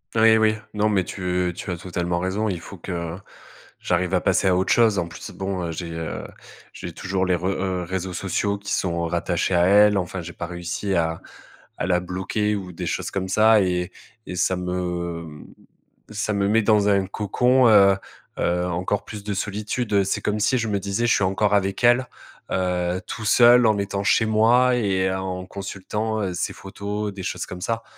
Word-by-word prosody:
Oui, 110 0 +6
oui. 110 0 +3 0.2
Non, 105 0 +1
mais 95 -4 +1
tu 90 -1 -2
tu 95 - -5
as 90 - -3
totalement 85 0 -2
raison. 95 +4 -1
Il 90 -3 -3
faut 95 +4 -11
que 85 -1 -5 0.6
j'arrive 90 0 0
à - - +4
passer - - +2
à 95 - +4
autre 95 - +2
chose. 110 -4 +4
En 85 - -2
plus, 85 - -9
bon, 95 -3 -3
j'ai, 85 +1 -5
heu, 80 -1 -5 0.5
j'ai 85 - -7
toujours 95 +1 -2
les 90 - +1
re 90 +1 -4
heu, 95 -1 -1
réseaux 95 +1 -4
sociaux 100 +2 -1
qui 100 0 -5
sont 85 -2 -1
rattachés 85 +1 0
à 85 - +4
elle. 105 +1 +6
Enfin, 95 0 -3
j'ai 85 +1 -8
pas 85 - -6
réussi 90 +3 -3
à 80 -1 0 0.6
à - - -2
la 90 -1 +3
bloquer 95 +4 -1
ou 90 -2 -8
des 90 +1 -5
choses - - -2
comme 95 -1 -3
ça 110 +2 +5
et 90 -1 -1 0.4
et 90 - -5
ça 95 +1 +1
me 85 -3 -4 0.7
ça 105 0 -2
me 100 -1 +1
met 110 +2 +4
dans 105 -1 +3
un 100 -2 +2
cocon, 125 +6 +3
heu 100 -2 +6 0.4
heu, 90 +1 +1
encore 90 +3 -2
plus 105 -2 -8
de 105 0 -3
solitude. 105 +1 -1
C'est 95 - -1
comme 105 0 -1
si 130 +5 +2
je 115 -2 -1
me 100 -2 0
disais: 100 +5 -1
«Je 120 - +4
suis - - +1
encore 95 +2 +1
avec 100 +2 0
elle, 120 +2 +5 0.5
heu, 90 -1 0
tout 120 - -6
seul, 120 +2 +6
en 110 -2 +3
étant 100 0 -2
chez 110 - +3
moi 120 +4 +4
et 95 -5 +1
en 95 -1 -4
consultant 100 +1 -3
ses - - -2
photos, 100 +1 -5
des 95 -1 -7
choses - - -3
comme 90 0 -8
ça». 115 +3 -2
95 Hz, 195 wpm, -23 LUFS, 90-105 Hz, 0.7 s, Oui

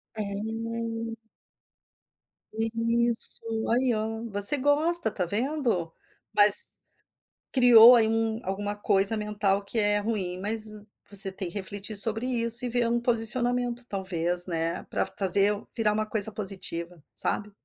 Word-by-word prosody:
É 215 - -5
nem 225 +2 -6 1.4
Isso 230 0 -3
aí 250 0 0
ó, 220 +1 -5
você 205 +7 +6
gosta, 300 +2 +2
está 185 -3 -4
vendo? 230 - -3 0.4
Mas, 205 -1 +6 0.7
criou 245 -2 +6
aí 225 -2 +2
um 225 0 -2
alguma 205 +2 -5
coisa 200 +1 0
mental 205 -2 -2
que 200 +3 -7
é 205 -1 +1
ruim, 195 -4 -4
mas, 215 +3 -1 0.4
você 195 -1 +4
tem 190 -1 -6
que 175 - -15
refletir 205 +2 -4
sobre 225 +3 +1
isso 235 -1 +3
e - - -4
ver 240 0 -1
um 235 0 -1
posicionamento 240 +1 +1
talvez, 180 -2 +1
né, 165 -1 -4
pra - - -3
fazer 200 +1 +2 0.2
virar 215 -2 0
uma 215 0 -3
coisa 215 0 -2
positiva, 180 -5 -6
sabe? 210 0 -4
220 Hz, 135 wpm, -25 LUFS, 200-230 Hz, 1.4 s, você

